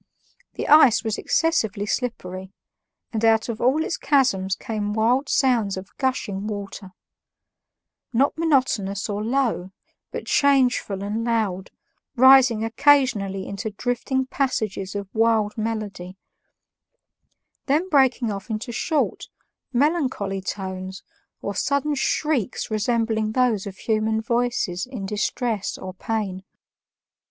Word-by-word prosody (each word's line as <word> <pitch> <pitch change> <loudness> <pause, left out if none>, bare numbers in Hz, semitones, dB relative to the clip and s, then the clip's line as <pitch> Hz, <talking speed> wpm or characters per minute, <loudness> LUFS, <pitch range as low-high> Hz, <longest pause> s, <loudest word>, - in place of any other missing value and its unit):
The - - -4
ice 285 -7 +6
was 220 -2 -2
excessively 220 -11 0
slippery, 190 -6 -4 0.6
and 220 0 -2
out 225 +1 +3
of 230 -1 -4
all 270 +6 +3
its - - -2
chasms 200 -10 +2
came 210 -1 -3
wild 245 +6 +2
sounds 235 -8 +2
of 190 +1 -9
gushing 215 -7 -1
water 200 -2 -6 1.2
not 260 +4 +2
monotonous 255 -11 +1
or 205 0 -3
low, 235 -6 0 0.4
but - - -5
changeful 255 -8 +2
and 210 +3 -2
loud, 215 -6 -1 0.5
rising 260 -3 +6
occasionally 225 -6 +2
into 200 +3 -4
drifting 245 +4 -2
passages 215 -8 -2
of 200 -1 -4
wild 220 -2 +2
melody, 210 -5 -4 1.5
then 305 +6 +2
breaking 265 - +3
off 200 +3 -7
into 220 +3 -4
short, 305 +5 -1 0.4
melancholy 255 - 0
tones 190 -1 -5 0.4
or 200 - -2
sudden 280 +8 0
shrieks 285 -5 -1
resembling 220 0 0
those 235 -6 +1
of 195 -1 -8
human 220 0 0
voices 235 -5 -1
in 245 -7 -6
distress 210 +1 -2
or 185 0 -7
pain. 195 -2 -3
220 Hz, 115 wpm, -23 LUFS, 200-255 Hz, 1.5 s, ice